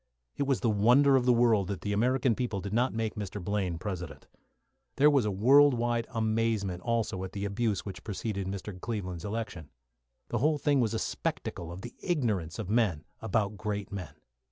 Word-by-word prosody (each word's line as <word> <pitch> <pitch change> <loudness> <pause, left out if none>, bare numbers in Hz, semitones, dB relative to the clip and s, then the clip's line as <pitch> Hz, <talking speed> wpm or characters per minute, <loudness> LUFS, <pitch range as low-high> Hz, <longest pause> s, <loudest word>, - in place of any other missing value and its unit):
It 140 - -1
was 135 -2 +1
the 115 - +2
wonder 125 +7 +5
of 125 -2 +3
the - - +7
world 115 -5 +3
that 100 -2 -4
the 100 - -2
American 125 +3 +2
people 110 -4 -2
did 100 +1 -5
not 125 +3 +2
make 110 -1 -2
Mr. 105 -2 -5
Blaine 95 -2 -1
President. 90 -3 -6 0.7
There 150 +2 +6
was 135 -6 +3
a - - +1
world 135 +8 +6
wide 120 -1 0
amazement 110 -4 0
also 115 -5 -1
at 95 0 -6
the 100 0 -3
abuse 105 0 -1
which 95 -3 -7
preceded 100 -2 -3
Mr. 95 -1 -6
Cleveland's 95 -6 -4
election. 105 -8 -5 0.6
The - - -1
whole 150 +3 +2
thing 145 -1 +2
was 115 -2 +1
a - - +1
spectacle 85 -5 -3
of 90 +4 -8
the 120 - -7
ignorance 105 - -1
of 110 -5 -4
men 100 -8 +1 0.2
about 110 -2 0
great 105 -1 -3
men. 90 -7 -6
105 Hz, 190 wpm, -29 LUFS, 95-120 Hz, 0.7 s, the